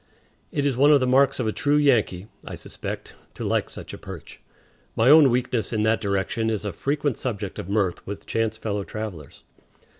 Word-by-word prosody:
It 145 - -1
is 140 -3 +1
one 140 +4 +5
of 145 - +6
the 130 - +1
marks 135 +2 +3
of 125 - 0
a 110 - +1
true 145 +6 +1
Yankee, 115 -10 +2 0.2
I - - -7
suspect, - - -7 0.2
to - - -6
like - - 0
such - - -7
a - - -8
perch. - - -10 0.5
My 115 +5 +5
own 150 -3 +8
weakness 125 -3 0
in 110 -2 0
that 110 0 +2
direction 100 +2 -1
is 105 -2 -2
a 100 - -3
frequent 145 - -1
subject 105 -6 -4
of 90 - -6
mirth 100 -3 -1
with 100 +1 -6
chance 110 -1 -1
fellow 105 -2 -3
travelers. 95 -10 -7
110 Hz, 200 wpm, -24 LUFS, 105-135 Hz, 0.5 s, own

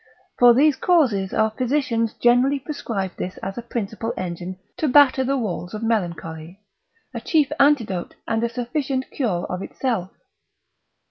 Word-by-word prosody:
For 245 -1 +7
these 290 +2 +4
causes 240 - +2
our 220 0 +2
physicians 235 -2 -1
generally 250 +4 +3
prescribe 230 - -4
this 185 - -5
as 195 - -4
a 240 - -5
principal 225 -1 -4
engine 180 0 -5 0.2
to 310 - 0
batter 275 -1 +5
the 275 +2 0
walls 195 -4 -4
of 215 - -6
melancholy, 170 -5 -3 0.5
a - - -5
chief 305 -5 +2
antidote, 235 -11 +2
and 225 0 0
a 235 - +1
sufficient 260 +2 -3
cure 205 -11 -1
of 180 +1 -4
itself. 210 -6 -2
230 Hz, 145 wpm, -22 LUFS, 190-265 Hz, 0.5 s, For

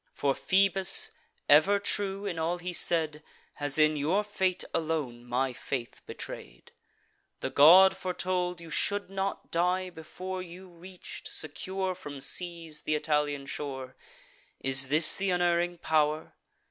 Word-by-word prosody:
For 140 -1 +1
Phoebus, 195 +3 +2 0.4
ever 160 +8 +6
true 200 0 -3
in 175 -5 -3
all 165 +2 -1
he 180 0 -5
said, 160 -3 +2 0.3
Has 145 0 0
in 155 0 +4
your 160 +8 +1
fate 190 -3 -1
alone 150 -7 -2
my 125 +1 -1
faith 125 -1 -5
betray'd. - - -9 0.7
The - - -3
god 180 +7 +8
foretold 180 -1 -2
you 165 -1 -11
should 200 +1 -1
not 195 0 -4
die, 180 +2 0
before 185 +3 -7
You 180 +1 -11
reach'd, 180 +1 -11
secure 185 +5 -3
from 145 -6 -9
seas, 165 0 -2
th' - - -9
Italian 150 -2 0
shore. 135 -2 -6 0.6
Is 135 0 +3
this 155 +3 +5
th' 195 0 -1
unerring 175 -1 +1
pow'r?" 155 -1 0
170 Hz, 135 wpm, -29 LUFS, 150-185 Hz, 0.7 s, god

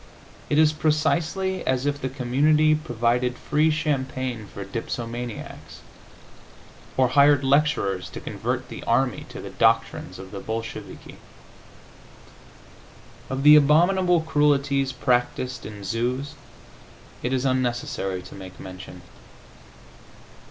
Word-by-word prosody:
It 145 - +1
is 155 0 +5
precisely 165 +5 0
as 130 0 +1
if 145 -1 -1
the 130 - -2
community 145 +4 +3
provided 125 -3 0
free 150 +1 +1
champagne 130 -7 -2
for 100 0 -8
dipsomaniacs, 115 +2 -6 1.2
or 130 -1 +4
hired 140 +1 +5
lecturers 135 - +1
to - - -8
convert - - -3
the - - -8
army 125 +1 0
to - - -8
the - - -8
doctrines 115 +7 +1
of 95 0 -10
the 100 - -6
Bolsheviki. 115 +2 -7 2.1
Of 135 0 -3
the 150 +1 +9
abominable 175 +4 +4
cruelties 140 -3 +1
practised 125 -1 -1
in 105 -2 -9
zoos 125 +7 -2 0.9
it 125 - -2
is 130 0 0
unnecessary 120 -7 -1
to 90 - -12
make 95 -1 -11
mention. 90 -1 -10
130 Hz, 110 wpm, -24 LUFS, 115-150 Hz, 2.1 s, the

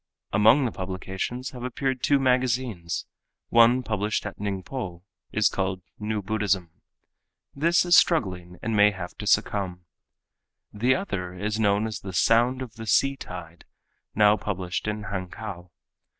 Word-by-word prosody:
Among 110 +7 +5
the 120 - -1
publications 95 +7 -4
have 125 - -9
appeared 130 0 -2
two 145 - +4
magazines. 125 -8 0 0.4
One 120 +2 +5
published 105 -2 -1
at 105 - -6
Ningpo, 95 -2 -4 0.3
is 105 -2 +3
called 95 -2 -2 0.2
"New 105 -1 -2
Buddhism." 100 -4 0 0.8
This 170 +5 +3
is 175 0 +5
struggling 90 - +1
and 115 0 -1
may 105 0 +6
have 90 -3 -7
to - - -5
succumb. 90 -4 0 0.9
The 120 +5 +2
other 90 - -4
is 105 +3 -2
known 105 0 +2
as 110 -2 -4
the 95 -1 -8
"Sound 120 +6 +3
of 120 -2 -11
the 110 0 -7
Sea 135 +5 +3
Tide," 90 -7 -9 0.5
now 105 0 +5
published 95 -1 -3
in 105 0 -2
Hankow. 95 -1 -6
105 Hz, 140 wpm, -26 LUFS, 95-125 Hz, 0.9 s, may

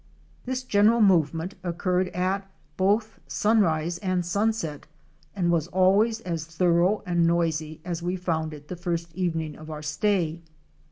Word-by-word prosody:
This 255 0 -2
general 220 0 +4
movement 170 -3 +3
occurred 180 +1 0
at 190 +2 -2 0.3
both 205 +5 +1
sunrise 175 -6 +1
and 185 -3 -1
sun 205 +5 +2
set 165 -10 -6 0.5
and 175 -3 +1
was 165 -2 +1
always 200 +5 +3
as 165 -5 -3
thorough 175 +4 +2
and 175 -2 +2
noisy 160 -2 0
as 175 -2 -3
we 175 +2 -1
found 160 -3 -2
it 150 -1 -11
the 180 - -5
first 170 -1 -3
evening 165 -4 -2
of 155 0 -11
our 150 -1 -6
stay. 165 +1 0
175 Hz, 150 wpm, -26 LUFS, 165-195 Hz, 0.5 s, general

